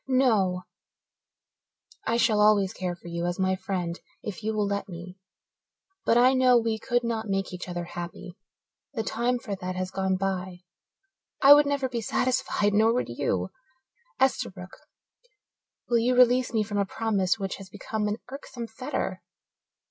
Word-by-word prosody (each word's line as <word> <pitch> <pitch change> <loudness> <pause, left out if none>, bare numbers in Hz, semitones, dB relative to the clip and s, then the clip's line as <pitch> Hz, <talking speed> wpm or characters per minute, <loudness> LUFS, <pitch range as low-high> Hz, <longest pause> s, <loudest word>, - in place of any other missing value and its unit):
"No 215 -9 +2 1.4
I 230 - +2
shall 225 -3 +3
always 205 -2 +4
care 180 -2 -3
for 175 - -14
you 170 0 -2
as 175 - -2
my 190 0 +1
friend 180 -2 -3 0.2
if 210 -2 -6
you 220 0 -1
will 210 -1 0
let 200 0 -2
me. 180 +2 -9 0.9
But 230 - +4
I 250 +2 +6
know 255 -1 +5
we 225 -1 0
could 245 +1 0
not 225 -2 -2
make 195 -1 -1
each 180 0 -6
other 175 0 -3
happy 175 +1 -7 0.6
the 225 - -1
time 240 +3 0
for 220 -5 -5
that 185 -1 -5
has 185 0 -3
gone 190 -1 0
by. 185 -2 -3 0.8
I 280 +1 +11
would 295 0 +5
never 280 -2 0
be 240 -2 -3
satisfied, 215 -3 0
nor 220 +2 +4
would 250 - -1
you. 95 -6 -1 0.7
Esterbrook, 185 -8 -1 1.1
will 235 -1 +3
you 245 +2 +2
release 250 0 +5
me 220 -2 +1
from 205 -1 -3
a 200 - +2
promise 200 -4 0
which 195 -2 -4
has 195 -1 -11
become 210 +2 -3
an 210 +1 -1
irksome 265 -3 -7
fetter?" 255 +6 -4
210 Hz, 165 wpm, -27 LUFS, 185-235 Hz, 1.4 s, I